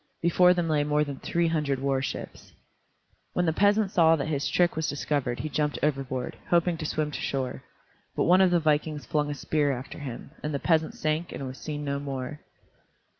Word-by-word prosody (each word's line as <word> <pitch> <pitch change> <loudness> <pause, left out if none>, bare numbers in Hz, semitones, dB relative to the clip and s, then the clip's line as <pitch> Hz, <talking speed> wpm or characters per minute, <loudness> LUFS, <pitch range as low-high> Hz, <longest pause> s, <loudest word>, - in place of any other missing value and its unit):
Before 180 +1 +5
them 175 -1 0
lay 150 -2 +2
more 150 0 +2
than 140 -2 -6
three 170 0 0
hundred 150 -4 0
war 135 0 0
ships. 130 - -6 0.8
When 180 - +1
the 160 - +2
peasant 205 +2 +3
saw 165 -3 +5
that 150 -1 -3
his 145 -2 -1
trick 175 -1 +2
was 160 0 -1
discovered 140 -4 -1
he 155 - -3
jumped 150 0 -1
overboard, 135 -4 -1
hoping 175 0 +3
to 155 -1 -3
swim 150 -1 -1
to - - -5
shore. 130 -2 -2 0.5
But - - +1
one 180 +2 +5
of 190 - +5
the 175 -1 +3
vikings 150 -1 0
flung 150 -1 0
a 145 - -3
spear 145 0 0
after 130 0 -6
him, 135 -2 -7
and 150 -1 -3
the - - -1
peasant 160 0 +1
sank 155 +2 -1
and 135 - -5
was 130 0 -7
seen 150 -1 -5
no 140 0 -1
more. 140 0 -5
150 Hz, 205 wpm, -27 LUFS, 140-165 Hz, 0.8 s, Before